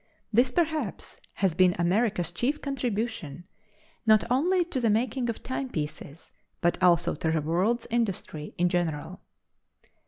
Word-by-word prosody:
This, 245 +4 +4
perhaps, 315 - -2
has 190 -4 +1
been 180 +1 +4
America's 180 0 +1
chief 255 +12 -1
contribution, 220 - -3 0.6
not 215 -2 +5
only 350 +8 +3
to 310 -7 -3
the 230 - +2
making 240 +3 0
of 230 - -4
timepieces, 155 - -5 0.3
but, 175 - 0
also 175 -1 +4
to 160 - -2
the 160 - +1
world's 185 +10 0
industry 195 -9 -2
in 175 - +3
general. 175 0 -2
205 Hz, 130 wpm, -27 LUFS, 170-245 Hz, 0.6 s, not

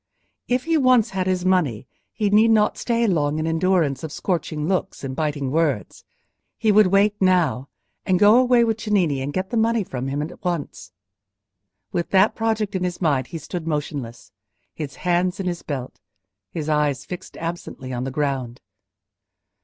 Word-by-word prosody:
If 250 +1 +1
he 330 0 +1
once 255 -5 +4
had 190 -1 -2
his 185 -1 0
money 160 - +1 0.3
he 210 -2 -1
need 215 +2 +5
not 215 -1 +3
stay 235 -1 0
long 155 -7 +1
in 155 - -1
endurance 165 -4 +1
of 160 - -5
scorching 160 -4 -2
looks 185 -5 -2
and 130 -1 -4
biting 145 -3 -2
words. 150 -8 -1 0.5
He 220 -2 +2
would 210 -1 +6
wait 200 +2 +3
now, 175 -8 +2 0.3
and 185 - +2
go 210 +5 +6
away 245 -2 +4
with 225 -1 0
Cennini 180 -11 +1
and 135 +2 -3
get 185 +4 -3
the 235 - 0
money 225 0 +2
from 130 -6 -5
him 140 +2 -2
at 160 - -9
once. 170 -5 -4 1.0
With 170 - -2
that 195 +2 +4
project 220 -2 -1
in 185 -1 -1
his 180 -1 -3
mind 140 -7 +1
he 165 - -6
stood 165 0 -6
motionless—his 145 0 -6
hands 180 +2 0
in 195 - -3
his 175 -1 -2
belt, 130 -4 -6 0.5
his 155 +5 -5
eyes 150 -3 0
fixed 180 0 -8
absently 165 -6 -6
on 125 0 -3
the 135 - -3
ground. 135 -4 -2
175 Hz, 170 wpm, -22 LUFS, 145-205 Hz, 1.0 s, would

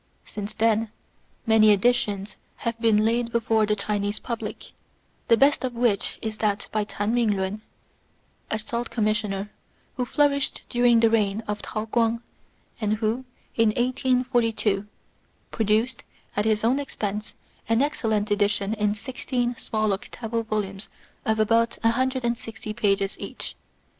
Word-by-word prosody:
Since 205 0 -6
then 225 0 +2 0.6
many 220 -2 +6
editions 205 -1 +2 0.3
have 230 -1 -2
been 215 -2 +4
laid 235 +1 +1
before 225 -2 +2
the 210 - +2
Chinese 205 0 -1
public, 235 -2 -5 0.6
the 230 - +5
best 280 +4 +4
of 250 -2 -2
which 230 -4 +1
is 220 -1 -3
that 210 -1 0
by 215 -1 0
Tan 205 +1 -2
Ming 225 -4 +2
lun, 190 +3 -2 0.9
a 220 - 0
Salt 235 +2 -4
Commissioner, 210 -2 -1 0.5
who 250 - 0
flourished 280 +2 +1
during 240 -2 +4
the 230 - +5
reign 215 -1 +1
of 210 0 -3
Tao 215 0 -4
Kuang, 230 +1 +1 0.6
and 210 -1 +1
who 225 +4 -1 0.3
in 225 -2 +3
1842^ 245 -5 +1 0.6
produced, 225 +3 +1 0.3
at 205 - +1
his 215 -1 +2
own 250 +5 +3
expense, 210 -6 -4 0.3
an 225 +3 +4
excellent 220 -7 0
edition 205 0 +1
in 210 -1 +1
sixteen 245 +1 -2
small 215 -2 0
octavo 225 +3 -3
volumes 210 -3 -3 0.4
of 220 0 +2
about 230 +2 +3
160 235 -3 0
pages 200 -3 0
each. - - -5
220 Hz, 135 wpm, -25 LUFS, 210-235 Hz, 0.9 s, many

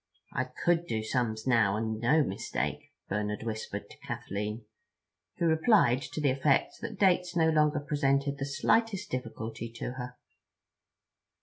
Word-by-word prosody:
"I - - 0
could 175 0 0
do 110 -5 -1
sums 110 -1 -1
now, 110 -6 +3
and 110 0 -2
no 150 +7 +4
mistake," 95 - -3 0.2
Bernard 105 +1 -2
whispered 110 -1 -4
to - - -15
Kathleen, 105 +3 -4 0.7
who 170 - 0
replied 160 - +4
to 155 - -6
the 145 -3 +3
effect 135 +1 +1
that - - -5
dates 180 -2 +3
no 160 -1 +4
longer 150 -1 +3
presented 140 -1 +1
the 135 - -1
slightest 205 +8 +1
difficulty 115 -2 -5
to 120 - -4
her. 125 -1 -7
130 Hz, 140 wpm, -30 LUFS, 110-155 Hz, 0.7 s, no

